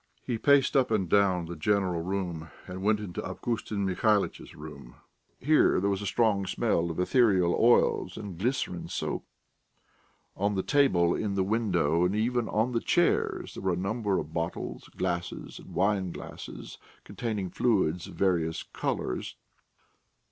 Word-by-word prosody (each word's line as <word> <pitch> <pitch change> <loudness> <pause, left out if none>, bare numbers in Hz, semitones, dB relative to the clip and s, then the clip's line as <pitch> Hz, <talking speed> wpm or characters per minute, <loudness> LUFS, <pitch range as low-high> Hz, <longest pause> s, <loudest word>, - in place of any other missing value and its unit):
He 120 -3 -2
paced 140 0 +4
up 130 -2 +4
and 105 -5 +1
down 95 -2 +3
the 85 +1 -6
"general 90 0 +1
room," 85 -3 -3 0.2
and 90 +1 -7
went 105 +1 +2
into 100 -5 -5
Avgustin 110 -4 -3
Mihalitch's 100 +2 0
room. 70 -5 -10 0.4
Here 155 +4 +4
there 100 +2 +1
was 100 0 -2
a 100 - -3
strong 100 -1 +1
smell 85 -1 0
of 80 - -4
ethereal 95 -4 +3
oils 120 +1 +3
and 100 -4 -6
glycerine 100 -3 -2
soap. - - -3 1.1
On 100 +1 0
the 95 - 0
table, 95 -13 +3
in 100 -2 -2
the 95 - +2
window, 90 -6 +1
and 90 +3 +1
even 120 +1 0
on 110 +4 +1
the 115 -1 0
chairs, - - +1
there - - -7
were 95 -1 +1
a - - -2
number 100 +1 -1
of 75 - -5
bottles, 85 0 -4
glasses, 90 -1 -3
and - - -12
wineglasses 95 -2 -3 0.2
containing 105 -6 -4
fluids 95 -8 +1
of - - -11
various 85 -4 0
colours. 60 - -3
95 Hz, 150 wpm, -28 LUFS, 85-110 Hz, 1.1 s, paced